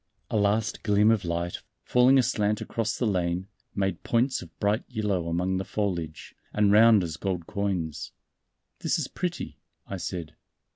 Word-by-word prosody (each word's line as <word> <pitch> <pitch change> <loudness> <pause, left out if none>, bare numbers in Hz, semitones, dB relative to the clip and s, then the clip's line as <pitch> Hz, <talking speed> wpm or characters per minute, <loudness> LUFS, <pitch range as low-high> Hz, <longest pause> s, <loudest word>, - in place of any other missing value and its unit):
A - - -1
last 105 +1 +1
gleam 105 +1 +4
of 110 -3 +1
light, 85 0 -2 0.2
falling 125 +2 +5
aslant 110 -4 +2
across 110 -3 -2
the 125 - 0
lane, 90 -2 0 0.3
made 95 -1 -1
points 125 +3 +1
of 90 - -10
bright 105 +3 +1
yellow 105 -8 -1
among 90 +3 0
the 95 - -1
foliage, 85 -8 -3 0.2
and 105 -1 +3
round 110 -1 +7
as 80 -1 -4
gold 90 -3 -2
coins. 90 -7 -3 0.7
"This - - 0
is - - -2
pretty," 175 -1 -4 0.3
I 100 - -5
said. 85 -3 -5
100 Hz, 155 wpm, -27 LUFS, 90-110 Hz, 0.7 s, round